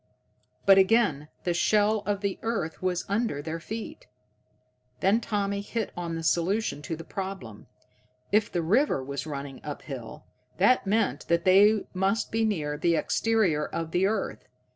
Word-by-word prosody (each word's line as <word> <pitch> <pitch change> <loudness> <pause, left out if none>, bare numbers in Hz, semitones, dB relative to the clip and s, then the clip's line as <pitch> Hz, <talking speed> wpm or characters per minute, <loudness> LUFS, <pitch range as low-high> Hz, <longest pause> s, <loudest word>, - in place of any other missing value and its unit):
But, 195 0 +7
again, 190 -8 +3 0.2
the 175 - 0
shell 210 +4 +3
of 205 -1 0
the 200 -2 -2
earth 225 -8 -3
was 180 -1 -1
under 205 -6 -1
their 160 +3 -4
feet! 220 +6 -7 0.9
Then 205 +5 +3
Tommy 200 -2 -1
hit 220 +2 -3
on 170 -1 -4
the 165 - -4
solution 170 -1 0
to 160 +2 -4
the 165 - -9
problem. 190 - -7 0.6
If 210 0 +2
the 175 -2 -1
river 205 - +2
was 140 +2 -5
running 140 -2 -6
up 145 -1 -6
hill, 125 -6 -8 0.3
that 205 +3 +3
meant 195 - 0
that 170 +1 +1
they 200 +3 +5
must 195 +4 0
be 225 +1 +1
near 150 -8 -2
the 170 0 +2
exterior 190 -6 +1
of 165 -1 -4
the 180 +3 +2
earth. 210 -1 -3
190 Hz, 160 wpm, -27 LUFS, 160-210 Hz, 0.9 s, But